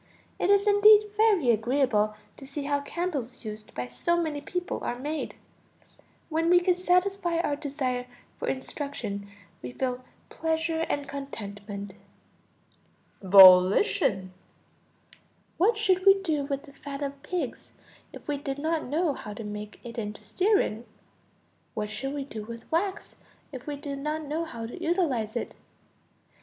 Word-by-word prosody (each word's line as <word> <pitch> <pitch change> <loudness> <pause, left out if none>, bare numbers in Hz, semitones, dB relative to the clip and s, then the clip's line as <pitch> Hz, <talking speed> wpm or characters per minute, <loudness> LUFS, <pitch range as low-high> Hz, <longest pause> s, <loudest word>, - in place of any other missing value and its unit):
It 360 - +1
is 400 0 +5
indeed 420 0 +6
very 415 - +4
agreeable 225 -2 +1 0.2
to 270 - -10
see 280 +1 -5
how 285 0 0
candles 280 -7 -4
used 215 0 -8
by 125 - -2
so 340 - 0
many 310 -4 -2
people 360 +4 -4
are 240 - -2
made. 295 +4 -4 0.9
When 325 +1 0
we 355 0 +7
can 360 0 +2
satisfy 360 -1 +1
our 315 -4 0
desire 265 -4 -3 0.3
for - - -5
instruction 260 -7 -4 0.3
we 125 0 -7
feel 255 -1 -2 0.3
pleasure 320 0 -1
and 285 -1 -2
contentment. 205 -7 -7 1.3
Volition. 190 - +6 1.2
What 425 +6 +3
should 380 -4 +2
we 390 0 +7
do 305 -6 0
with 280 0 -3
the 285 -3 -15
fat 280 0 -6
of 280 0 -5
pigs 360 +3 -4 0.4
if - - -12
we 295 -1 -1
did 275 -1 -4
not 315 +2 -1
know 305 +3 0
how 210 -5 -8
to 225 - -7
make 210 0 -7
it 235 -1 -6
into 210 -1 -6
stearine? 375 - +1 0.9
What 210 -1 -3
should 270 +6 -4
we 285 - -2
do 220 -6 -7
with 230 +1 -9
wax 380 +4 -1 0.3
if 260 -1 -9
we 295 - -2
did 280 -1 -6
not 305 +2 -2
know 310 +3 -2
how 235 -8 -6
to 245 +10 -8
utilize 290 - 0
it? 235 - -3
280 Hz, 150 wpm, -27 LUFS, 230-335 Hz, 1.3 s, we